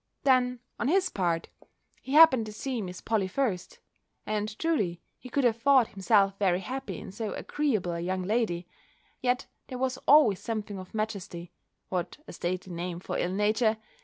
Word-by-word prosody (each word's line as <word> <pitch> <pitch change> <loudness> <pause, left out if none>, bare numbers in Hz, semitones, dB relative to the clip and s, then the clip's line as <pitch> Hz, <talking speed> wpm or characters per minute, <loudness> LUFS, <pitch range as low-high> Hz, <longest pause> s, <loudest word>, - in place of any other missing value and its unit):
Then, 250 -2 +3 0.2
on 240 - 0
his 375 +5 +3
part, 170 -3 -1 0.5
he 265 - -6
happened 295 -8 +7
to - - -6
see 245 +2 -3
Miss 180 -2 -7
Polly 215 -4 0
first; 195 -4 -2 0.5
and 215 0 -2
truly, 210 - 0 0.2
he 255 - -10
could 280 +2 0
have 230 -2 +2
thought 270 -4 +5
himself 195 0 +2
very 185 -2 +2
happy 265 +5 -5
in - - -8
so 215 +1 -4
agreeable 240 -12 -1
a 170 - -3
young 185 +2 -2
lady; 185 -4 0 0.5
yet 250 -1 +1 0.2
there 255 - -6
was 260 0 -1
always 270 -10 +6
something 215 -3 -4
of 185 +3 -10
majesty 195 -5 -4 0.4
(what 180 -2 -3
a - - -9
stately 180 +1 -3
name 175 0 -4
for - - -4
ill 175 - 0
nature!) 215 +2 +2
215 Hz, 170 wpm, -28 LUFS, 185-255 Hz, 0.5 s, happened